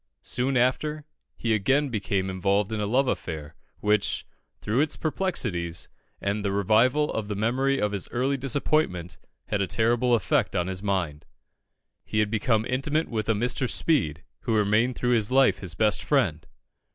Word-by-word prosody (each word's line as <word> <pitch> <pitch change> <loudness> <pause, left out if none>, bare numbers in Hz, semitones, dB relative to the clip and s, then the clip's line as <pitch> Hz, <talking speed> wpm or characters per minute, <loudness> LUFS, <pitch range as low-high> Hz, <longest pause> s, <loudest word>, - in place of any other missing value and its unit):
Soon 130 +2 0
after, 150 +5 0 0.3
he 115 -1 0
again 135 +8 +2
became 100 -4 -1
involved 100 +3 0
in 110 - -2
a 105 - -1
love 130 +5 +2
affair, 80 -8 -4 0.3
which, 105 -1 +1 0.3
through 110 +4 -1
its 150 0 +1
perplexities 120 - -2 0.3
and 100 +1 -2
the 100 - 0
revival 115 +9 +3
of 110 -2 -3
the 105 - -3
memory 130 +6 +1
of 105 - 0
his 100 -2 -2
early 130 +3 0
disappointment, 130 - -1 0.3
had 100 - 0
a 100 - 0
terrible 120 +4 +2
effect 120 -2 0
upon 90 -2 +1
his 95 0 -4
mind. 90 -7 -2 0.8
He - - -4
had 105 -1 +2
become 110 0 +1
intimate 145 +6 0
with 110 -2 -3
a - - +5
Mr. 120 +3 -1
Speed, 85 - +1 0.2
who 115 -3 -1
remained 105 +4 +2
through 125 0 +1
life 135 +1 +4
his 90 -4 -4
best 105 +2 +2
friend. 90 - +1
110 Hz, 165 wpm, -26 LUFS, 100-130 Hz, 0.8 s, a